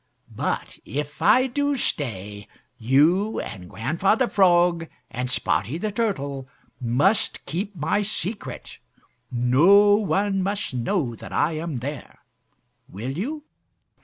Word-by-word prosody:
But -, -, -3 dB
if 145 Hz, +3 st, -5 dB
I 255 Hz, +1 st, +5 dB
do 285 Hz, +2 st, 0 dB
stay, 105 Hz, -, -3 dB, 0.3 s
you 155 Hz, -, +3 dB
and 90 Hz, -5 st, -7 dB
Grandfather 170 Hz, -, +1 dB
Frog 175 Hz, -4 st, +3 dB, 0.2 s
and 125 Hz, +2 st, -3 dB
Spotty 130 Hz, +2 st, 0 dB
the 210 Hz, +4 st, -2 dB
Turtle 140 Hz, -, -2 dB, 0.3 s
must 140 Hz, -, +1 dB
keep 195 Hz, +4 st, -4 dB
my 170 Hz, +6 st, 0 dB
secret. 205 Hz, 0 st, -5 dB, 0.5 s
No 160 Hz, +13 st, +5 dB
one 200 Hz, -1 st, 0 dB
must 200 Hz, -4 st, -2 dB
know 125 Hz, -, -1 dB
that 115 Hz, -, -10 dB
I 160 Hz, -, +1 dB
am 155 Hz, -2 st, -4 dB
there. 135 Hz, +2 st, -6 dB, 0.7 s
Will 115 Hz, +7 st, -5 dB
you?" 290 Hz, -, -4 dB
165 Hz, 115 wpm, -24 LUFS, 130-205 Hz, 0.7 s, I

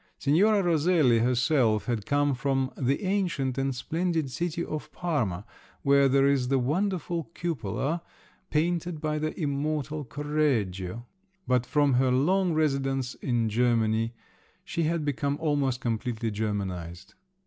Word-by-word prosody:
Signora 195 Hz, +8 st, +3 dB
Roselli 160 Hz, -7 st, +3 dB
herself 125 Hz, -2 st, +2 dB
had 115 Hz, -4 st, -2 dB
come 145 Hz, 0 st, +2 dB
from 135 Hz, 0 st, 0 dB
"the 135 Hz, +6 st, 0 dB
ancient 160 Hz, -10 st, 0 dB
and 135 Hz, -1 st, -1 dB
splendid 160 Hz, +2 st, -1 dB
city 170 Hz, +3 st, -2 dB
of 150 Hz, 0 st, -6 dB
Parma 120 Hz, -, -2 dB, 0.4 s
where 140 Hz, 0 st, +5 dB
there 135 Hz, +1 st, +4 dB
is 140 Hz, -3 st, +2 dB
the 135 Hz, +1 st, +2 dB
wonderful 170 Hz, +4 st, -1 dB
cupola, 155 Hz, -, -2 dB, 0.5 s
painted 170 Hz, +1 st, 0 dB
by 155 Hz, 0 st, -1 dB
the 155 Hz, +3 st, -3 dB
immortal 150 Hz, 0 st, -2 dB
Correggio!" 120 Hz, -8 st, -1 dB, 0.4 s
But 125 Hz, -1 st, +1 dB
from 145 Hz, -1 st, +3 dB
her 130 Hz, +1 st, +3 dB
long 175 Hz, +7 st, +2 dB
residence 135 Hz, -4 st, 0 dB
in 120 Hz, -3 st, -1 dB
Germany 115 Hz, 0 st, +1 dB, 0.5 s
she 165 Hz, -, -1 dB
had 160 Hz, -1 st, 0 dB
become 140 Hz, +1 st, -1 dB
almost 140 Hz, -5 st, 0 dB
completely 115 Hz, -1 st, -2 dB
Germanised. 95 Hz, -4 st, -4 dB
140 Hz, 125 wpm, -27 LUFS, 120-155 Hz, 0.5 s, where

